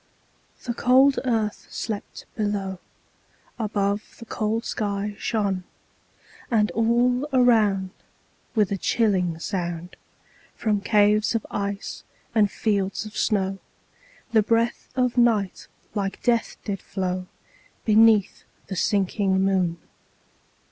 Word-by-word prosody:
The 240 Hz, -, -2 dB
cold 265 Hz, +3 st, +4 dB
earth 220 Hz, -4 st, -1 dB
slept 215 Hz, -3 st, -5 dB
below, 200 Hz, -4 st, -2 dB, 0.8 s
Above 205 Hz, -1 st, -1 dB
the 230 Hz, -, -10 dB
cold 225 Hz, +1 st, -2 dB
sky 205 Hz, -1 st, -2 dB
shone; 200 Hz, -5 st, -1 dB, 0.9 s
And 215 Hz, -3 st, +2 dB
all 240 Hz, +4 st, +2 dB
around, 215 Hz, -7 st, +3 dB, 0.6 s
with 210 Hz, -4 st, +2 dB
a 200 Hz, -, 0 dB
chilling 185 Hz, -8 st, +1 dB
sound, 175 Hz, -1 st, -4 dB, 0.6 s
From 210 Hz, -3 st, 0 dB
caves 210 Hz, +1 st, +3 dB
of 225 Hz, -, -1 dB
ice 200 Hz, 0 st, -4 dB, 0.3 s
and 215 Hz, -3 st, +4 dB
fields 200 Hz, -1 st, -1 dB
of 215 Hz, -, -10 dB
snow, 195 Hz, -2 st, 0 dB, 0.7 s
The 220 Hz, -, +5 dB
breath 230 Hz, +2 st, 0 dB
of 250 Hz, -1 st, +1 dB
night 220 Hz, -5 st, +2 dB, 0.3 s
like 195 Hz, -2 st, -3 dB
death 235 Hz, -2 st, +1 dB
did 200 Hz, -3 st, -3 dB
flow 185 Hz, -1 st, -3 dB, 0.5 s
_5 -, -, -38 dB
Beneath 215 Hz, -2 st, +4 dB, 0.3 s
the 190 Hz, -, -3 dB
sinking 195 Hz, 0 st, +1 dB
moon. 185 Hz, -3 st, +1 dB
210 Hz, 110 wpm, -24 LUFS, 195-230 Hz, 0.9 s, The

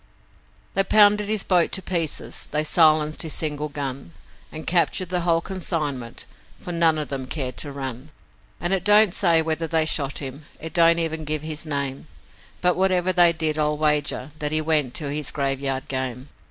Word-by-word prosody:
They 195 Hz, -, +2 dB
pounded 210 Hz, 0 st, +4 dB
his 215 Hz, -2 st, +2 dB
boat 180 Hz, -3 st, +2 dB
to 190 Hz, -, +1 dB
pieces, 165 Hz, -5 st, -2 dB
they 150 Hz, +1 st, 0 dB
silenced 155 Hz, -1 st, +4 dB
his 160 Hz, -3 st, -1 dB
single 150 Hz, -1 st, -2 dB
gun, 135 Hz, -, -6 dB, 0.4 s
And 155 Hz, 0 st, -7 dB
captured 175 Hz, +1 st, +1 dB
the 180 Hz, -1 st, 0 dB
whole 170 Hz, -1 st, +1 dB
consignment, 155 Hz, -10 st, -4 dB, 0.3 s
for 180 Hz, -, -7 dB
none 165 Hz, -2 st, +3 dB
of 150 Hz, -3 st, -4 dB
'em 130 Hz, -1 st, -4 dB
cared 130 Hz, -4 st, -3 dB
to 145 Hz, -, -4 dB
run; 135 Hz, 0 st, -6 dB, 0.5 s
And 175 Hz, +2 st, -1 dB
it 190 Hz, -2 st, 0 dB
don't 210 Hz, -1 st, +5 dB
say 170 Hz, -5 st, +3 dB
whether 160 Hz, +1 st, -2 dB
they 160 Hz, 0 st, +1 dB
shot 145 Hz, -3 st, 0 dB
him 140 Hz, +2 st, -7 dB
it 160 Hz, -1 st, -8 dB
don't 170 Hz, -1 st, +4 dB
even 160 Hz, -1 st, -2 dB
give 155 Hz, 0 st, -2 dB
his 155 Hz, 0 st, -4 dB
name 140 Hz, -1 st, -3 dB, 0.5 s
But 180 Hz, -1 st, +2 dB
whatever 185 Hz, -1 st, +1 dB
they 175 Hz, -1 st, +6 dB
did 160 Hz, -2 st, -1 dB
I'll 150 Hz, 0 st, 0 dB
wager 150 Hz, -2 st, 0 dB
that 150 Hz, -1 st, -1 dB
he 155 Hz, -, +3 dB
went 155 Hz, -5 st, 0 dB
to 145 Hz, -4 st, -2 dB
his 150 Hz, -1 st, 0 dB
graveyard 135 Hz, -1 st, -2 dB
game. 130 Hz, 0 st, -4 dB
155 Hz, 180 wpm, -22 LUFS, 140-170 Hz, 0.5 s, they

